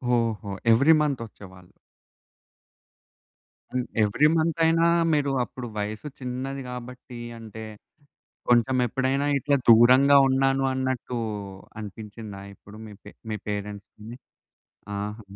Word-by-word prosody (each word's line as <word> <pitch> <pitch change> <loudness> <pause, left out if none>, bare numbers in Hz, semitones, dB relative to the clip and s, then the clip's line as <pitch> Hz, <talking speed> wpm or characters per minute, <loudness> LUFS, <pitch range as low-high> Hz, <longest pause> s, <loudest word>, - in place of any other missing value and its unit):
ఓహో! 115 -3 -1 0.2
ఎవ్రీ 140 +8 +6
మంతొచ్చేవాళ్ళు. 105 -10 -5 2.0
హ్మ్. 125 -1 -1 0.2
ఎవ్రీ 135 +9 +3
మంతయినా, 165 +1 +2 0.3
మీరు 145 -2 +1
అప్పుడు 125 0 -8
వయసు 105 +7 -4
చిన్నది 130 +2 -4
గాబట్టి, 125 0 -9 0.2
అంటే 110 -1 -9 0.9
కొంచెం 120 +2 +3
ఎప్పుడైనా 135 +3 0
ఇట్లా 140 +2 +1
దూరంగా 130 +5 +7
ఉన్నాను 135 0 +2
అన్నట్టు 130 -2 -2 0.6
అనిపించిందా? 105 -1 -9
ఎప్పుడు 105 +1 -15
మీ 105 - -11
పే - - -11 0.2
మీ - - -1
పేరెంట్స్‌ని. 105 +2 -6 0.8
ఆహా! 105 +2 -5
120 Hz, 100 wpm, -25 LUFS, 105-135 Hz, 2.0 s, దూరంగా